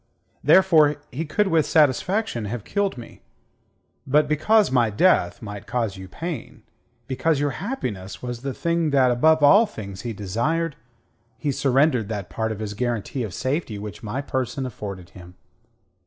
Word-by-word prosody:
Therefore 160 -6 +5 0.2
he 160 +6 -3
could 200 +6 +1
with 165 -2 +3
satisfaction 155 - +2
have 110 +1 -4
killed 200 -6 -1
me. 120 - -11 0.9
But 150 +2 +3
because 200 +8 +3
my 120 -4 +3
death 105 - +2
might 105 -1 -8
cause 115 -5 -1
you 95 0 -9
pain, 160 - -7 0.4
because 140 +4 0
your 145 0 0
happiness 120 - -4
was 120 -1 -6
the 135 -1 -4
thing 170 -2 0
that 135 -3 +4
above 155 +5 +3
all 205 +10 +7
things 100 - -8
he 120 - -4
desired, 135 - -1 0.6
he 145 - -1
surrendered 135 -4 +2
that 100 -4 -5
part 110 0 -2
of 110 - -4
his 105 -1 -4
guarantee 120 +2 -2
of 110 -5 -3
safety 130 - -2
which 100 -3 -8
my 115 +6 -3
person 130 0 -2
afforded 100 -7 -7
him. 90 -1 -13
130 Hz, 155 wpm, -23 LUFS, 105-155 Hz, 0.9 s, all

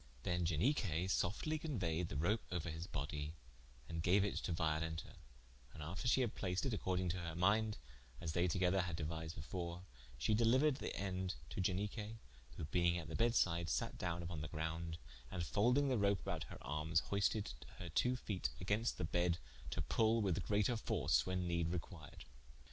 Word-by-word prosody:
Then 90 +2 +1
Ianique 90 - +2
softly 130 - 0
conueyed 90 - -1
the 75 - -4
rope 100 +9 +2
ouer 85 -2 -2
his 80 +2 -5
bodye, 75 0 -3 0.5
and 80 -1 -3
gaue 95 +4 +4
it 100 - -1
to - - -2
Violenta, 80 0 -1 0.6
and 75 - -6
after 90 +10 -3
she 125 +2 +5
had 120 -4 0
placed 90 +2 -1
it 130 - 0
according 95 -3 0
to 90 +2 -1
her 85 -2 -4
minde, 105 +5 +3 0.4
as 85 -2 -2
they 90 +2 +3
together 95 +2 +3
had 85 -3 -3
deuised 80 0 -3
before, 85 +3 -4 0.3
she 65 - +2
deliuered 130 +6 +4
thende 95 -2 -2 0.2
to - - -1
Ianique, 105 +4 -1 0.4
who 80 - -3
being 85 +2 +2
at 80 -2 -5
the - - -4
beddes 115 +1 +3
side 85 -1 +2
satte - - -1
down 85 -1 -2
vpon 85 -3 -4
the 75 - -3
grounde, 80 +1 -3 0.3
and 85 0 -2
folding 125 - +3
the 125 -4 +2
rope 100 -1 +3
about - - -3
her - - -9
armes, 75 +4 +1
hoisted 100 +1 +1 0.2
her 90 - -6
twoo 125 +9 +2
feete 100 -6 -2
against 100 +5 0
the 90 - -1
bedde 85 +1 +2 0.3
to - - -1
pull 115 +1 +3
with 95 -1 +1
greater 105 +4 +2
force 110 - +2
when 90 -1 0
nede 85 -1 +1
required. 85 -2 -6
90 Hz, 180 wpm, -39 LUFS, 80-105 Hz, 0.6 s, she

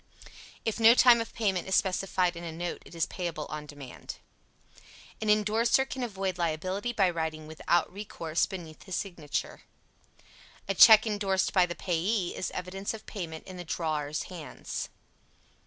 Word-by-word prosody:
If 225 +1 -1
no 230 +1 +8
time 245 -2 +7
of 230 - -6
payment 195 -6 -1
is 190 - +1
specified 185 -2 +1
in 170 - -7
a 165 - -5
note 175 +2 -4
it - - -13
is 165 - +1
payable 170 -4 -4
on 150 -1 -5
demand. 145 -4 -9 1.1
An 215 - -1
indorser 215 +5 +3
can 265 - -5
avoid 195 -6 -3
liability 185 +7 -1
by 200 -5 +3
writing 160 -2 -3
"without 160 +3 0
recourse" 170 -5 -2
beneath 170 -5 -8
his 190 -3 -4
signature. 170 -7 -4 1.1
A 195 - +1
check 220 +3 +9
indorsed 200 -3 0
by 185 -2 +5
the 175 - -5
payee 180 +3 -1
is - - -2
evidence 195 +4 -4
of 220 - -12
payment 165 -6 -6
in 185 -1 -9
the 180 - -6
drawer's 155 -3 -2
hands. 170 -5 -6
185 Hz, 155 wpm, -29 LUFS, 165-205 Hz, 1.1 s, check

